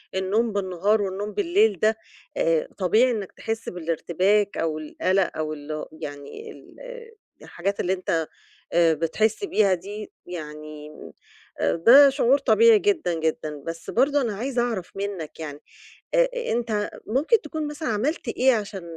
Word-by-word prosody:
النوم 205 Hz, +4 st, 0 dB
بالنهار 200 Hz, +2 st, +1 dB
والنوم 200 Hz, +2 st, -3 dB
بالليل 405 Hz, +4 st, +2 dB
ده، 220 Hz, +1 st, +2 dB, 0.4 s
آآ -, -, +1 dB
طبيعي 220 Hz, +7 st, +3 dB
إنّك 205 Hz, -5 st, -4 dB
تحس 225 Hz, 0 st, -4 dB
بالارتباك 180 Hz, +4 st, 0 dB
أو 160 Hz, -1 st, -1 dB
القَلق 185 Hz, +5 st, 0 dB
أو 155 Hz, 0 st, -2 dB
ال 150 Hz, +1 st, -6 dB, 0.2 s
يعني 145 Hz, -, -8 dB
ال -, -, -16 dB, 0.7 s
الحاجات 195 Hz, +3 st, -4 dB
اللي 185 Hz, +1 st, +1 dB
أنت 165 Hz, -4 st, -1 dB, 0.5 s
آآ 170 Hz, -1 st, +5 dB
بتحس 210 Hz, -, 0 dB
بيها 200 Hz, -, +3 dB
دي، 205 Hz, +4 st, -6 dB
يعني 150 Hz, -3 st, -8 dB, 0.7 s
آآ -, -, +1 dB
ده 265 Hz, +11 st, +8 dB
شعور 270 Hz, 0 st, +3 dB
طبيعي 455 Hz, +8 st, +5 dB
جدًا، 360 Hz, -, +1 dB
جدًا. 155 Hz, -2 st, -3 dB
بس 165 Hz, 0 st, -6 dB
برضه 280 Hz, +3 st, +2 dB
أنا 220 Hz, -5 st, -2 dB
عايزة 245 Hz, +2 st, -1 dB
أعرف 225 Hz, -7 st, -3 dB
منّك 195 Hz, -6 st, -5 dB
يعني، 150 Hz, -2 st, -6 dB, 0.6 s
آآ -, -, +5 dB, 0.2 s
أنت 225 Hz, -3 st, -1 dB, 0.2 s
ممكن 295 Hz, -, +2 dB
تكون 305 Hz, 0 st, -4 dB
مثلًا 295 Hz, -1 st, -4 dB
عملت 240 Hz, +6 st, -1 dB
إيه 260 Hz, +3 st, +3 dB
عشان 205 Hz, -3 st, -4 dB
205 Hz, 140 wpm, -24 LUFS, 170-255 Hz, 0.7 s, ده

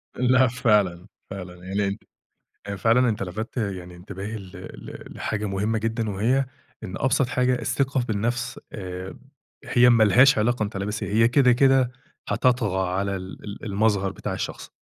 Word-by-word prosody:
لأ 125 Hz, +1 st, +4 dB
فعلًا، 105 Hz, -7 st, +1 dB, 0.2 s
فعلًا 90 Hz, -2 st, -7 dB
يعني 100 Hz, +1 st, 0 dB
أنت 100 Hz, +2 st, -5 dB, 0.6 s
أ 100 Hz, -, -3 dB
فعلًا 115 Hz, +5 st, +3 dB
أنت 105 Hz, -2 st, -2 dB
لفتّ 110 Hz, +7 st, -6 dB
يعني 95 Hz, -5 st, -4 dB
انتباهي 100 Hz, +4 st, -7 dB
ل 95 Hz, -2 st, -11 dB
ل -, -, -10 dB
لحاجة 105 Hz, 0 st, -3 dB
مهمة 105 Hz, +3 st, -1 dB
جدًا، 115 Hz, 0 st, -2 dB
وهي 120 Hz, +8 st, +1 dB, 0.4 s
إن 95 Hz, -, -6 dB
أبسط 135 Hz, 0 st, +2 dB
حاجة 125 Hz, 0 st, +1 dB
الثقة 135 Hz, +1 st, 0 dB
في 120 Hz, -2 st, -3 dB
النفس، 115 Hz, +4 st, -2 dB
آآ، 90 Hz, -1 st, -6 dB, 0.5 s
هي 125 Hz, -1 st, +5 dB
ما 115 Hz, -2 st, +6 dB
لهاش 125 Hz, +5 st, +6 dB
علاقة 115 Hz, +1 st, +1 dB
أنت 105 Hz, 0 st, -4 dB
لابس 105 Hz, +2 st, -3 dB
إيه، -, -, -4 dB
هي 115 Hz, +1 st, +5 dB
كده، 125 Hz, +1 st, +4 dB
كده 130 Hz, 0 st, +4 dB, 0.4 s
هتطغى 105 Hz, -8 st, +1 dB
على 100 Hz, +2 st, -1 dB
ال 95 Hz, 0 st, -8 dB
ال 105 Hz, +2 st, -8 dB
المظهر 100 Hz, -1 st, +1 dB
بتاع -, -, -5 dB
الشخص. -, -, -5 dB
110 Hz, 165 wpm, -24 LUFS, 95-125 Hz, 0.6 s, ما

